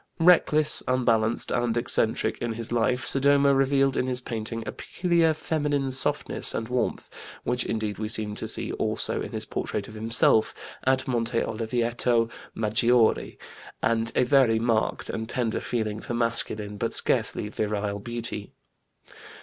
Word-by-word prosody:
Reckless, 160 -3 +5
unbalanced, 115 -3 +2
and 120 -1 0
eccentric 115 -1 +2
in 120 -1 -3
his 115 0 -1
life, 120 +1 0
Sodoma 140 +1 +4
revealed 135 0 +2
in 125 - 0
his 125 -1 -1
painting 115 -2 -5
a - - -4
peculiar 170 -3 0
feminine 145 -4 -1
softness 130 - -1
and 115 - -3
warmth 125 0 -2 0.4
which 125 0 0
indeed 110 -2 -3
we 110 - -2
seem 105 -1 -1
to - - -4
see - - -1
also - - -1
in - - -6
his - - -4
portrait 100 -1 -4
of - - -11
himself 110 0 +2 0.3
at 130 0 +1
Monte 115 -2 0
Oliveto 115 +1 0 0.2
Maggiore 115 +2 +2 0.5
and 115 0 0
a - - +3
very 125 -3 +3
marked 115 -1 -1
and 110 +1 -5
tender 120 -3 -2
feeling 110 -3 -3
for 120 - -5
masculine, 110 -3 0
but - - -2
scarcely - - +1
virile, 105 -1 -3
beauty. 115 -2 -5
115 Hz, 145 wpm, -25 LUFS, 110-130 Hz, 0.5 s, Reckless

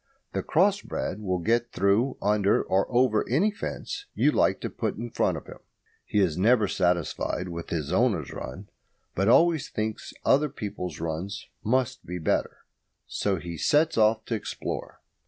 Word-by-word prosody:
The - - 0
cross 200 +5 +2
bred 95 - -4
will 95 -3 -1
get 115 +6 +1
through, 100 +8 +2
under, 105 -1 +3
or 95 +5 0
over 120 -3 +3
any 170 - +3
fence 205 - -5
you - - +4
like - - +2
to - - -3
put - - -3
in 120 +1 -5
front - - +1
of - - -9
him. - - -11 0.5
He 105 - +1
is 90 -3 +1
never 110 +1 +4
satisfied 90 0 0
with 85 -1 -6
his 80 -1 -2
owner's 95 - +1
run, 95 +10 -7 0.4
but 95 +2 0
always 160 +4 +4
thinks 110 0 -3
other 150 +2 +4
people's 95 - -5
runs 85 +5 -4 0.2
must 125 +2 0
be 90 - -5
better, 80 - -1 0.4
so 100 -2 -1
he 85 -1 -6
sets 150 - +3
off 110 0 +3
to - - -3
explore. 110 - -5
105 Hz, 165 wpm, -27 LUFS, 90-125 Hz, 0.5 s, you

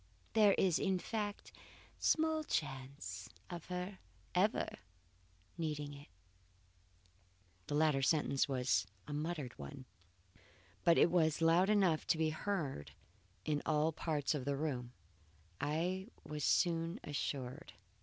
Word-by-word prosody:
There 210 -2 +6
is, 180 -4 +3
in 190 -2 +2
fact, 205 +1 -4 0.5
small 315 0 +2
chance 135 - -3 0.2
of 170 -2 -6
her 180 +2 -4 0.3
ever 195 +4 +3 0.9
needing 150 -3 -2
it." 140 0 -11 1.6
The 145 - -1
latter 150 -2 +3
sentence 140 -1 +2
was 125 -9 +2 0.2
a 145 - -4
muttered 150 -3 -3
one, 70 - -8 1.0
but 170 - +6
that - - +5
it 170 - +5
was 160 -3 +3
loud 165 +4 +5
enough 190 -7 +3
to 165 - +3
be 160 -1 +2
heard 150 - -3 0.5
in 150 -1 +1
all 155 +1 +2
parts 155 -2 0
of 145 -4 -2
the 140 +1 -1
room 130 -5 -2 0.7
I 175 +6 -1 0.2
was 150 -1 -5
soon 170 +4 +2
assured. 140 0 -4
155 Hz, 125 wpm, -36 LUFS, 140-180 Hz, 1.6 s, There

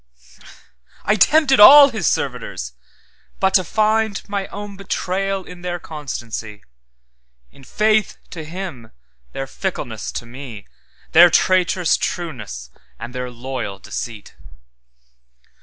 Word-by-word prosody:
I 210 - +3
tempted 270 +6 +4
all 280 +6 +10
His 220 - -2
servitors, 65 -1 -2 0.7
but 190 0 +2
to 185 - +5
findMy 215 -1 -1
own 205 0 -7
betrayal 195 0 -2
in 180 -1 -12
their 175 0 -3
constancy, 120 -10 -7 0.9
In 135 - -18
faith 215 +7 +1
to 165 -3 -7
Him 160 -8 -8 0.4
their 135 - -4
fickleness 130 - -5
to 120 - -5
me, 120 -4 -10 0.5
Their 175 +2 +8
traitorous 180 0 +2
trueness, 110 - -5 0.3
and 120 - -8
their 125 -1 -4
loyal 120 -4 -5
deceit. 110 +1 -7
175 Hz, 110 wpm, -20 LUFS, 125-200 Hz, 0.9 s, all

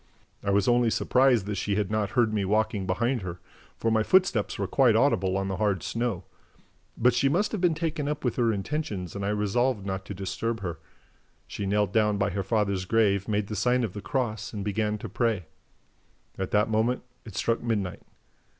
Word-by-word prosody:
I 100 - -1
was 100 0 +2
only 120 -1 +4
surprised 125 -2 +3
that 105 -1 -3
she 100 +1 -1
had 105 -1 -1
not 105 -2 0
heard 115 -3 +3
me 105 -2 +1
walking 105 -1 0
behind 115 +7 0
her, 90 -2 -6 0.4
for 115 - 0
my 110 0 +3
footsteps 130 - +2
were 100 - -1
quite 120 +3 +3
audible 95 -7 +2
on 95 0 -1
the 95 -1 -3
hard 100 -6 0
snow. 115 -6 -2 0.7
But 120 +1 +4
she 130 +3 +2
must 180 +9 +1
have 215 - -3
been 175 -3 +3
taken 160 -2 -2
up 150 -1 -3
with 120 - 0
her 120 -2 +3
intentions 100 - -3
and 100 - -4
I 100 - 0
resolved 105 +2 0
not 95 -1 -3
to 100 - -6
disturb 110 +4 -3
her. 85 -4 -4 0.7
She 100 - -5
knelt 105 -1 +1
down 105 -2 +3
by 100 0 0
her 100 - -2
father's 100 -3 0
grave, 100 -2 +2
made 105 -1 0
the 105 - -5
sign 125 +4 +2
of 105 -6 -3
the 105 - -6
cross 115 -4 -2
and 100 -2 -4
began 105 +1 0
to - - -7
pray. 115 -7 0 0.9
At 95 -1 -3
that 105 +1 +2
moment, 110 +3 +1 0.2
it 110 -5 -11
struck 115 +3 0
midnight. 105 -6 -2
105 Hz, 205 wpm, -27 LUFS, 100-120 Hz, 0.9 s, only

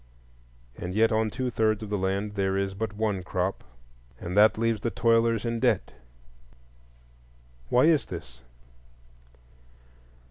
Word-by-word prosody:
And 90 +2 -6
yet 115 +1 +4
on 110 0 +1
two 125 +3 -3
thirds 110 -1 +1
of 105 - -8
the 105 - 0
land 100 +2 -1
there 95 -1 0
is 100 0 -1
but 110 +2 -3
one 105 -3 -1
crop, 90 +1 -3 0.6
and 90 +2 -5
that 105 +1 +5
leaves 115 -2 0
the 115 - 0
toilers 115 -1 +2
in 115 0 -1
debt. - - +1 1.8
Why 125 - +4
is 155 -5 +3
this? 65 0 -9
110 Hz, 135 wpm, -27 LUFS, 95-115 Hz, 1.8 s, that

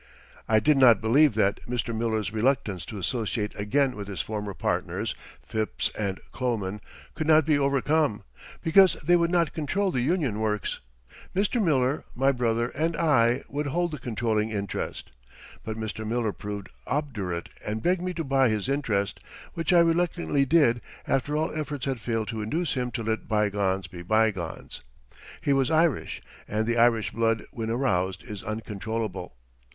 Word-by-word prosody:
I 110 -1 +5
did 150 +6 +3
not 120 -4 +7
believe 125 +3 +4
that 100 -2 +1
Mr. 120 -1 -2
Miller's 110 -1 -1
reluctance 110 -5 0
to 110 - -6
associate 105 +2 -2
again 130 +6 +1
with 100 -1 -6
his 100 -5 -5
former 105 +1 -3
partners, - - -1 0.3
Phipps 110 -1 -1
and 100 -3 -2
Kloman, 105 -6 -2 0.3
could 155 - -3
not 155 -1 +6
be 150 -2 +3
overcome, 140 -4 +1 0.4
because 185 +3 +6
they 175 - +5
would 170 -1 +3
not 170 -3 +2
control 190 +6 0
the 125 - 0
Union 140 - 0
Works. 105 -2 -1 0.6
Mr. 210 +4 +1
Miller, 140 -4 +2
my 135 +2 +3
brother, 120 -2 0
and 165 +5 -1
I 125 -6 +3
would 145 +1 -3
hold 175 +4 0
the 150 - -5
controlling 110 -2 -1
interest. 100 - -4 0.5
But 110 0 -5
Mr. 110 0 -4
Miller 110 -1 -1
proved 100 -1 -6 0.2
obdurate 105 - -2
and 110 +1 -3
begged 180 0 +2
me 180 0 -3
to 165 - -2
buy 135 -3 +3
his 105 -1 -1
interest, 115 -8 0 0.3
which 165 +2 -1
I 175 -1 +7
reluctantly 165 -4 +2
did 135 -6 +4 0.3
after 145 +3 0
all 160 +2 -1
efforts 150 -4 -3
had 135 -3 -2
failed 115 -3 -2
to 110 -1 -3
induce 155 +9 -1
him 125 -2 -1
to 115 -1 -3
let 110 0 -2
bygones 100 -3 +1
be 85 0 -9
bygones. 100 -3 -1 0.6
He 140 - +3
was 135 0 +2
Irish, 160 -1 +1 0.2
and 110 +1 -1
the 120 +1 0
Irish 115 -3 +3
blood 115 -1 0
when 115 -1 -4
aroused 95 -7 0
is 105 +1 -7
uncontrollable. 110 -5 -4
115 Hz, 165 wpm, -27 LUFS, 105-145 Hz, 0.6 s, not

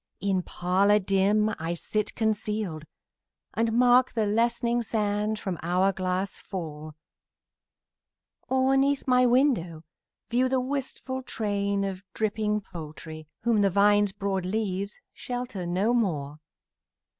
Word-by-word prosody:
In 195 -2 +1
parlour 190 +4 +2
dim 205 +2 +2
I 165 +2 -2
sit 215 +5 -2
concealed, 210 -7 -1 0.7
And 225 0 +1
mark 245 +1 +5
the 220 -2 +1
lessening 235 +3 +1
sand 210 -1 -1
from 190 -5 -4
hour 180 +3 +2
glass 185 +1 -2
fall; 155 -5 -7 1.5
Or 265 +1 +3
'neath 275 +1 +1
my 250 0 +5
window 235 - +2 0.4
view 250 +2 +2
the 260 0 +2
wistful 260 0 -4
train 200 -4 -1
Of 190 -1 -3
dripping 210 -1 0
poultry, 155 -3 -9 0.2
whom 230 -2 +3
the 200 - +4
vine's 205 +1 +4
broad 195 -1 -2
leaves 200 0 -2
Shelter 245 -7 -5
no 190 +7 +1
more. 150 -11 -1
205 Hz, 120 wpm, -27 LUFS, 185-235 Hz, 1.5 s, mark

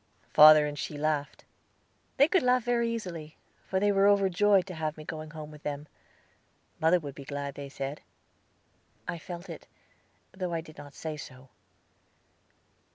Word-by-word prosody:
Father 155 0 +9
and 145 -1 -5
she 150 - -4
laughed. 150 -1 -2 0.7
They 280 +1 +6
could 370 +2 +3
laugh 250 -1 +3
very 235 -1 +1
easily, 170 -9 -6 0.3
for 190 - 0
they 205 +1 +3
were 195 0 +4
overjoyed 200 -1 +4
to 190 - -7
have 155 -2 -3
me 155 - -8
going 155 0 -7
home 155 -1 -9
with 150 -1 -13
them. 145 0 -5 0.9
Mother 165 +3 +4
would 145 -4 -7
be 140 - -10
glad, 140 0 -5
they 140 0 -8
said. 135 +1 -5 1.1
I 175 -1 -3
felt 175 +2 -8
it, - - -9 0.6
though 185 -2 -4
I 165 - -1
did 155 -2 -14
not 145 -1 -11
say 155 -1 -5
so. 130 -2 -11
155 Hz, 160 wpm, -29 LUFS, 150-190 Hz, 1.1 s, Father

